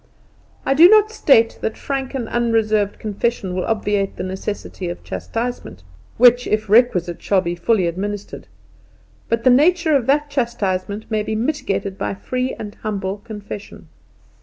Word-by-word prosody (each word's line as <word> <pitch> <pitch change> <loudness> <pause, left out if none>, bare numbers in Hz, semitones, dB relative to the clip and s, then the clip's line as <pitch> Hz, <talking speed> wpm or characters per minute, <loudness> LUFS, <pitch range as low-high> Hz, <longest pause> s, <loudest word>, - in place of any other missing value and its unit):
I 270 - +2
do 330 +6 +8
not 430 0 +5
state 230 - +3
that 220 - -3
frank 270 -1 -4
and 245 -4 -3
unreserved 220 -4 +1
confession 210 -2 -2
will 180 0 -2
obviate 205 -3 -1
the - - -5
necessity 190 -1 -5
of 175 - -7
chastisement, 235 - -5 0.3
which 245 +1 +5
if 215 0 0
requisite 195 -6 +3
shall 195 -2 +2
be 170 -1 -3
fully 190 +2 +1
administered; 200 +4 -5 0.8
but 230 0 0
the 255 - +6
nature 320 +4 +4
of 260 -4 +1
that 290 +1 +1
chastisement 210 -6 -2
may 215 -1 +1
be 215 +1 -3
mitigated 215 -6 -2
by - - -2
free 255 +6 -3
and 210 -1 -7
humble 200 -2 -3
confession. 205 -2 -9
220 Hz, 150 wpm, -20 LUFS, 195-250 Hz, 0.8 s, do